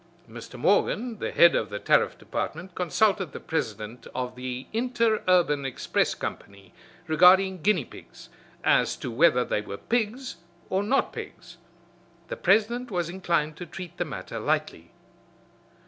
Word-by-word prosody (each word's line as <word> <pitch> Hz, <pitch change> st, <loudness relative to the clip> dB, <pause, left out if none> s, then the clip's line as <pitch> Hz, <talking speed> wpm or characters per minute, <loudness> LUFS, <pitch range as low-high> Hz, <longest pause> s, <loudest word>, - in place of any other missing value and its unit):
Mr. 120 Hz, +2 st, -10 dB
Morgan, 215 Hz, -, +1 dB
the -, -, -2 dB
head 170 Hz, 0 st, +6 dB
of 105 Hz, -, 0 dB
the 105 Hz, -, -4 dB
Tariff -, -, +2 dB
Department, 175 Hz, +4 st, -5 dB
consulted 190 Hz, -1 st, +1 dB
the -, -, -6 dB
president 110 Hz, -6 st, -4 dB
of 125 Hz, 0 st, -3 dB
the 125 Hz, 0 st, -5 dB
Interurban 215 Hz, -, +2 dB
Express 135 Hz, -2 st, -1 dB
Company 100 Hz, -2 st, -8 dB, 0.3 s
regarding 180 Hz, +3 st, +5 dB
guinea 180 Hz, -7 st, +2 dB
pigs, -, -, -14 dB, 0.3 s
as -, -, +3 dB
to 125 Hz, -, -6 dB
whether 125 Hz, -1 st, +4 dB
they 105 Hz, -, -1 dB
were 100 Hz, -1 st, -7 dB
pigs 235 Hz, -, -2 dB, 0.3 s
or 190 Hz, -, +2 dB
not 260 Hz, +7 st, +1 dB
pigs. -, -, -9 dB, 0.7 s
The -, -, -3 dB
president 235 Hz, -, +2 dB
was 175 Hz, -4 st, -2 dB
inclined 170 Hz, -4 st, -1 dB
to 175 Hz, -, -7 dB
treat 180 Hz, -3 st, -9 dB
the -, -, 0 dB
matter -, -, -6 dB
lightly. 85 Hz, +1 st, -2 dB
175 Hz, 140 wpm, -26 LUFS, 125-210 Hz, 0.7 s, head